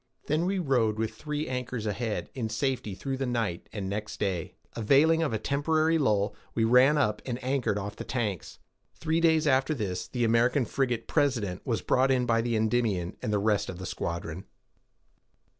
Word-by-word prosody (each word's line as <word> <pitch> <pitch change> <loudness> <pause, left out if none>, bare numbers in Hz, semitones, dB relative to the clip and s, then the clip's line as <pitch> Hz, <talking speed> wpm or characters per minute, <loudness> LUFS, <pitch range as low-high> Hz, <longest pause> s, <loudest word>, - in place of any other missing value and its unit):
Then 155 +4 +1
we 195 +1 0
rode, 125 - +1
with 110 0 -2
three 150 0 -4
anchors 125 -3 -3
ahead, 110 +1 -3
in 120 -5 -3
safety 110 -2 -2
through 135 +5 -4
the 135 -1 -2
night; 115 -8 -2
and 100 -3 -4
next 105 +2 -4
day, 95 -5 -2 0.2
availing 145 +8 +4
of 160 - 0
a 110 - 0
temporary 155 +6 +1
lull, 105 -6 +1 0.2
we 115 - +2
ran 125 +6 +5
up, 105 -6 +1
and 120 -2 -3
anchored 130 -5 0
off 105 +1 -5
the - - -5
Tanks. 105 -8 -3 0.4
Three 160 +1 0
days 160 -1 +4
after 135 +2 +2
this, 95 -7 -3
the 120 -2 -2
American 120 +3 +3
frigate 120 -1 -1
President 120 - 0
was 115 -7 -1
brought 130 +1 +3
in 130 -2 +2
by 115 -1 +2
the 120 0 -1
Endymion, 110 -5 0
and 105 - -2
the 105 - +2
rest 105 0 +1
of 90 - -6
the 95 - -7
squadron. 85 +1 -4
120 Hz, 185 wpm, -28 LUFS, 105-135 Hz, 0.4 s, ran